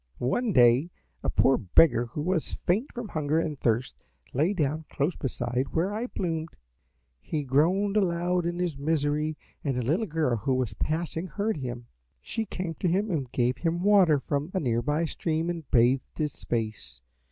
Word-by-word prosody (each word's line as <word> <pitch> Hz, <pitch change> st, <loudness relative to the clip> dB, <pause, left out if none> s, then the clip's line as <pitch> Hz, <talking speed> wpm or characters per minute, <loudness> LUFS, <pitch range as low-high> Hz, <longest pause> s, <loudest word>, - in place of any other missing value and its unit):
"One 220 Hz, -, 0 dB
day 125 Hz, +2 st, +5 dB, 0.3 s
a -, -, -1 dB
poor 135 Hz, 0 st, +3 dB
beggar 120 Hz, -, +4 dB
who 145 Hz, +5 st, -5 dB
was 180 Hz, -1 st, -1 dB
faint 210 Hz, +11 st, +1 dB
from 240 Hz, -4 st, -6 dB
hunger 155 Hz, 0 st, 0 dB
and 155 Hz, -4 st, -3 dB
thirst 120 Hz, +2 st, 0 dB, 0.4 s
lay 155 Hz, +8 st, +2 dB
down 155 Hz, -4 st, -1 dB
close 150 Hz, +5 st, -1 dB
beside 125 Hz, -1 st, -2 dB
where 180 Hz, +5 st, +1 dB
I 225 Hz, +4 st, -2 dB
bloomed. 165 Hz, -7 st, -3 dB, 0.6 s
He 150 Hz, -2 st, -3 dB
groaned 175 Hz, +10 st, +2 dB
aloud 175 Hz, -3 st, +1 dB
in 175 Hz, 0 st, -2 dB
his 175 Hz, -4 st, -1 dB
misery, 150 Hz, 0 st, 0 dB, 0.3 s
and 135 Hz, -4 st, -1 dB
a 125 Hz, -, 0 dB
little 170 Hz, -, +1 dB
girl 155 Hz, -7 st, 0 dB
who 130 Hz, +5 st, 0 dB
was 130 Hz, -3 st, -1 dB
passing 165 Hz, +2 st, -2 dB
heard 210 Hz, +1 st, -2 dB
him. 120 Hz, -3 st, -5 dB, 0.3 s
She 220 Hz, -, -4 dB
came 180 Hz, -3 st, -4 dB
to 185 Hz, -, 0 dB
him 195 Hz, +5 st, +1 dB
and 135 Hz, -7 st, -2 dB
gave 125 Hz, +1 st, +1 dB
him 170 Hz, +1 st, -1 dB
water 195 Hz, -7 st, +5 dB
from 145 Hz, +4 st, -2 dB
a -, -, +2 dB
near 120 Hz, -7 st, 0 dB
by 150 Hz, +6 st, 0 dB
stream 160 Hz, +1 st, -1 dB
and 165 Hz, -4 st, -7 dB
bathed 125 Hz, +2 st, +2 dB
his 150 Hz, -3 st, -3 dB
face. 110 Hz, -, -3 dB
155 Hz, 175 wpm, -27 LUFS, 130-175 Hz, 0.6 s, day